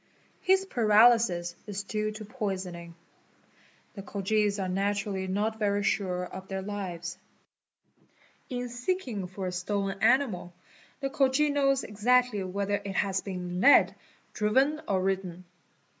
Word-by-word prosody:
His 380 +1 +3
paralysis 220 - +4
is 200 -1 -4
due 215 +1 -2
to 215 0 -8
poisoning. 185 -7 -5 1.0
The 200 - -7
Khojis 205 +1 0
are 190 -2 -2
naturally 195 0 -1
not 210 +4 -1
very 205 -1 +1
sure 180 -3 0
of 190 +1 -9
their 190 0 -4
lives. 180 -4 -5 0.7
| - - -35
'In 245 -1 -3
seeking 245 - -3
for 190 +1 -6
a 180 - -2
stolen 195 +2 -2
animal, 220 -8 +2 0.5
the 275 0 -2
Khoji 275 +2 +2
knows 275 -1 +2
exactly 235 +1 +2
whether 200 +2 -2
it 195 -1 -5
has 195 -1 +1
been 180 -2 -4
led, 285 +5 +6 0.4
driven, 265 +9 +2
or 190 -2 +1
ridden. 185 -2 -2
200 Hz, 130 wpm, -28 LUFS, 190-235 Hz, 1.0 s, led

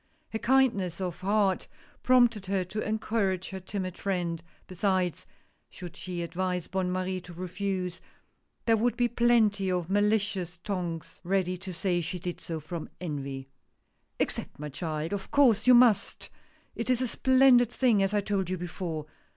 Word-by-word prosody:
Her 220 - -3
kindness 230 -10 +2
of 180 -3 -3
heart 200 0 +1 0.3
prompted 240 -6 +4
her 190 -1 0
to 200 +4 -5
encourage 210 -4 -1
her 190 - -5
timid 185 -1 -5
friend 175 -4 -1
— - - -33
besides, 185 -2 -1 0.4
should 175 -2 -9
she 175 -2 -5
advise 180 +1 -2
Bonne 185 -1 -1
Marie 185 0 -2
to 175 - -11
refuse, 185 0 -3 0.6
there 225 -1 +4
would 240 +1 +1
be 245 -1 +3
plenty 225 -5 +3
of 180 0 -2
malicious 205 -3 +1
tongues 175 -5 -4
ready 185 0 0
to 190 0 -7
say 180 0 0
she 180 +3 -4
did 175 0 -5
so 165 -1 -4
from 160 +1 -6
envy. 140 -5 -5 0.7
"Accept, - - -2
my 150 +1 -6
child! 155 +2 -3
of 200 -1 -4
course 245 -6 +4
you 250 - +9
must 235 -5 +3 0.2
— - - -35
it 230 - -4
is 255 0 +2
a - - 0
splendid 260 -1 +5
thing 240 -5 +2
as 195 +2 +1
I 205 - +3
told 195 -3 -1
you 185 - -1
before. 170 -3 -4
190 Hz, 165 wpm, -28 LUFS, 175-215 Hz, 0.7 s, you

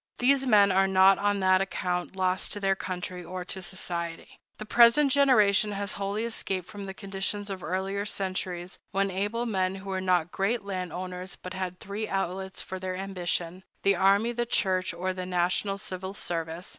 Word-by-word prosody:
These 270 +1 +3
men 205 -4 +6
are 195 +1 +4
not 190 0 +6
on 205 -1 +1
that 185 0 +4
account 180 -1 -2
lost 185 0 0
to 205 - -5
their 195 -1 +2
country 180 -1 -5
or 180 +1 -6
to 190 - -5
society. 170 -2 -4 0.2
The 215 - -7
present 240 +6 +6
generation 215 -7 +4
has 200 0 -3
wholly 200 +2 -2
escaped 195 -5 -1
from 205 +1 -8
the 190 - -5
conditions 200 +1 -3
of 190 -1 -5
earlier 190 +4 -2
centuries, 185 -2 -3
when 195 0 0
able 205 +6 -1
men 190 -4 0
who 195 0 -7
were 190 0 -1
not 180 -2 +2
great 200 +2 0
land 185 -3 -3
owners 180 +1 -6
had 185 -1 -4
but - - -40
three 210 +1 -4
outlets 190 0 -3
for 190 -1 -6
their 185 0 -3
ambition—the 185 0 -2
army, 200 +5 +4
the 240 0 -2
church, 185 -5 +1
or 185 +2 -2
the 185 -1 -5
national 185 +2 0
civil 190 0 -6
service. 165 -1 -4
190 Hz, 180 wpm, -28 LUFS, 185-200 Hz, 0.2 s, men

